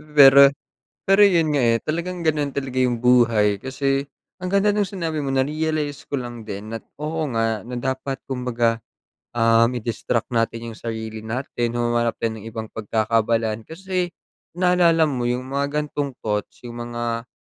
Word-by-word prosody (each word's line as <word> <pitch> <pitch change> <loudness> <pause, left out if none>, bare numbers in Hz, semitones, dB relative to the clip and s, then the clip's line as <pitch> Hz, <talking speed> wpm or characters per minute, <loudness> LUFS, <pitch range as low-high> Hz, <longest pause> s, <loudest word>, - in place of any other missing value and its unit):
Pero 140 -1 +9 0.6
pero 195 +2 +6
yun 165 -5 +2
nga 145 - +1
eh, 115 -2 +3
talagang 170 +3 -3
ganun 150 -3 0
talaga 135 -2 -3
yung 125 -2 +1
buhay 115 -5 +4
kasi 135 +2 -1 0.3
ang 185 - -4
ganda 200 +1 +4
nung 205 -1 +1
sinabi 165 -5 -3
mo 140 - -3
na-realize 150 +1 -1
ko - - -12
lang 120 -3 -6
din 100 +1 -6
na 115 - -3 0.2
oo 155 +1 -2
nga 115 -1 0
na 125 - -5
dapat 130 +2 -3
kumbaga 120 -3 0 0.6
um, 115 0 +4
i-distract 115 0 -2
natin 115 0 -1
yung - - -13
sarili 110 -1 -5
natin. 120 +1 -3
Humanap 120 -1 0
tayo 115 - +1
ng 110 - -11
ibang 110 -1 -6
pagkakaabalahan 110 +1 0
kasi 185 +1 -2 0.5
naalala 175 -3 +4
mo 125 -3 -2
yung 125 +1 -1
mga 140 +1 0 0.2
gan'tong 140 -2 -3
thoughts, 105 +2 -3
yung 120 0 -6
mga 120 0 -3
125 Hz, 160 wpm, -22 LUFS, 115-150 Hz, 0.6 s, Pero